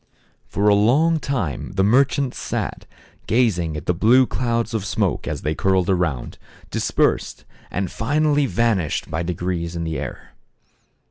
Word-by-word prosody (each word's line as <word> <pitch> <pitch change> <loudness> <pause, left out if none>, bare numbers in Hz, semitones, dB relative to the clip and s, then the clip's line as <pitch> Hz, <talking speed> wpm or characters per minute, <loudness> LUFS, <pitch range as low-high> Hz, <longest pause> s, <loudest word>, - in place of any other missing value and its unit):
For 100 +1 0
a 105 - +6
long 140 +11 +3
time 110 - -3
the 95 0 +1
merchants 130 +4 +2
sat, - - -4 0.4
gazing 90 -10 +1
at 75 - -7
the 90 - +2
blue 120 +9 +5
clouds 115 -2 -1
of 110 -3 -1
smoke 100 -5 -1
as - - -4
they 75 +3 0
curled 95 +2 +1
around, 85 -9 -1 0.3
dispersed, - - 0 0.2
and 95 -2 -3
finally 145 +3 +1
vanished 110 - 0
by 80 - -1
degrees 85 0 -3
in 85 - -3
the 80 -1 -3
air. - - -8
100 Hz, 145 wpm, -21 LUFS, 85-125 Hz, 0.4 s, a